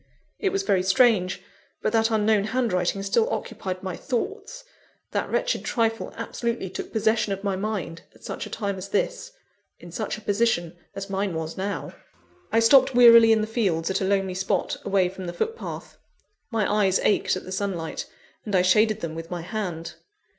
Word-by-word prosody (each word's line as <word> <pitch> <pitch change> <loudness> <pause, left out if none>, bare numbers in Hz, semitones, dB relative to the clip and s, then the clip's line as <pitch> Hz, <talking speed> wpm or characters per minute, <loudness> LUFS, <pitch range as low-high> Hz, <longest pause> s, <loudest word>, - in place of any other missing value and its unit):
It 400 - +1
was 390 +1 -1
very 190 - +2
strange; 190 -1 +3 0.4
but 215 - 0
that 225 0 +3
unknown 215 -2 +2
handwriting 200 -6 0
still 445 - +2
occupied 185 -1 -4
my 185 -2 -4
thoughts: 410 - -4 0.5
that - - -1
wretched - - 0
trifle 225 -2 -1
absolutely 230 -3 -3
took - - -6
possession 220 -2 +1
of 195 0 -6
my 200 -2 0
mind, 190 -5 -4
at - - -20
such - - -5
a - - -11
time 200 -3 -3
as 190 +2 -7
this; - - -1 0.5
in 175 - -12
such 215 +4 -3
a - - -11
position 205 -5 0 0.2
as 195 0 -5
mine 195 -2 -2
was 160 0 -4
now. 200 +2 -4 0.6
I 225 - +4
stopped 260 +2 +6
wearily 230 -2 +8
in 220 -1 +4
the - - 0
fields 190 -7 0
at 190 +2 -1
a - - +1
lonely 195 -1 +1
spot, 190 +1 -1
away 195 -2 +2
from 185 0 -7
the 175 - -4
footpath. 450 - -5 0.5
My 210 -2 +1
eyes 190 0 +3
ached 205 - +2
at 185 - -6
the 185 - -9
sunlight, 190 -4 -3 0.4
and 205 -3 -2
I 180 - +4
shaded 215 +4 +3
them 165 -2 -4
with 165 +1 -7
my 175 -1 -4
hand. 175 -4 -4
200 Hz, 180 wpm, -25 LUFS, 185-225 Hz, 0.6 s, wearily